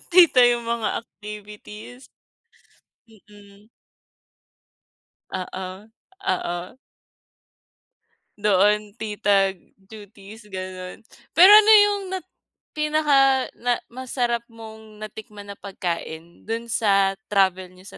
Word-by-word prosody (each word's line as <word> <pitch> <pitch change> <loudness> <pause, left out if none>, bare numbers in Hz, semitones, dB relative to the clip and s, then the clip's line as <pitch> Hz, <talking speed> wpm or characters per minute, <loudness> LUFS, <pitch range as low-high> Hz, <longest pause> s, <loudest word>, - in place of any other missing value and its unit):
Tita 335 -8 +7
yung 240 -1 +1
mga 230 -1 -2
activities, 210 +3 -11 1.0
mm. 205 0 -19 1.6
Oo, 190 +2 -7 0.4
oo. 175 +3 -3 1.6
Doon, 210 +1 +2
tita 205 -3 +1 0.2
duties, 205 +1 -14
gano'n. 185 -1 -8 0.3
Pero 365 +4 +8
ano 425 +1 +8
yung 410 -1 +1
nat 370 -2 -6 0.4
pinaka 295 -3 +2
na 245 0 -1
masarap 240 -1 -3
mong 220 -2 -13
natikman 210 -1 -10
na 200 - -10
pagkain, 170 -3 -6
do'n 230 +1 -4
sa 195 -3 +2
travel 190 -2 +1
niyo 185 - -17
210 Hz, 85 wpm, -23 LUFS, 195-235 Hz, 1.6 s, Pero